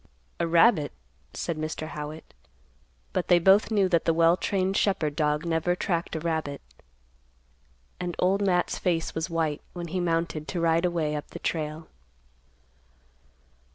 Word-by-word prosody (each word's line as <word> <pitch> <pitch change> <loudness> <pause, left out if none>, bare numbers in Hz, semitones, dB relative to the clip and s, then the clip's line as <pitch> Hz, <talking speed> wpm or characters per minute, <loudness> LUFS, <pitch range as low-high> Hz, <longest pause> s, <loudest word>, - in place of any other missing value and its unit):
"A 170 - +1
rabbit," 165 -2 +4 0.4
said 165 -2 -3
Mr. 155 0 -4
Howitt. 150 +1 -7 0.8
But 185 - -1
they 175 - +6
both 190 +5 +5
knew 205 -4 +3
that 170 -3 +2
the 165 - +2
well 165 +1 +5
trained 190 0 -1
shepherd 160 -8 +1
dog 150 0 0
never 170 +1 +1
tracked 170 -3 -2
a - - -1
rabbit, 160 -3 -2 1.4
and 175 -1 -3
Old 190 +2 +2
Matt's 180 -3 +1
face 165 -3 0
was 160 +2 -3
white 160 -3 -1
when 175 -1 -6
he 185 +3 -2
mounted 165 -3 -1
to 175 - -3
ride 165 +1 +2
away 165 -4 0
up 150 - -5
the - - -9
trail. 155 0 -3
165 Hz, 150 wpm, -27 LUFS, 155-180 Hz, 1.4 s, they